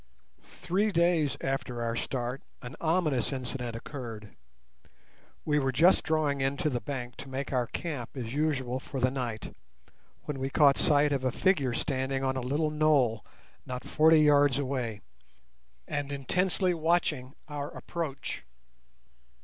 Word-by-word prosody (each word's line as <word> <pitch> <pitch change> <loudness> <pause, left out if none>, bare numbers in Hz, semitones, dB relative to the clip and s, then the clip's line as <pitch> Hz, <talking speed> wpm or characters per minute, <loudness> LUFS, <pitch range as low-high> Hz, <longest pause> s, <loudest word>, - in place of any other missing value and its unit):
Three 205 +4 -1
days 170 -5 +2
after 130 -3 -2
our 115 0 -1
start 125 +2 -3 0.2
an 125 +4 -7
ominous 155 -8 +1
incident 125 -2 -4
occurred. 115 -4 -7 1.1
We 150 -1 +2
were 135 -1 +1
just 165 +8 +5
drawing 150 -3 +1
in 135 +1 0
to 155 -2 0
the 120 -2 -2
bank 125 -4 -5
to 140 - -8
make 135 +1 -4
our 125 -2 +1
camp 140 -7 -4
as 120 -2 -4
usual 135 -4 0
for 135 0 -6
the 130 0 +2
night, 120 -5 -4 0.7
when 145 -2 -4
we 135 +1 -1
caught 140 -1 +5
sight 145 0 +4
of 135 -2 0
a 130 - +1
figure 140 -6 +2
standing 135 0 -1
on 130 0 0
a 130 - -1
little 145 +5 0
knoll 145 -7 +3 0.4
not 125 -1 -5
forty 160 0 +5
yards 145 -3 +5
away, 130 -6 -2 0.9
and 145 -2 -2
intensely 180 +6 +1
watching 155 -5 0
our 145 -1 -4
approach. 155 -5 -5
140 Hz, 145 wpm, -29 LUFS, 125-155 Hz, 1.1 s, just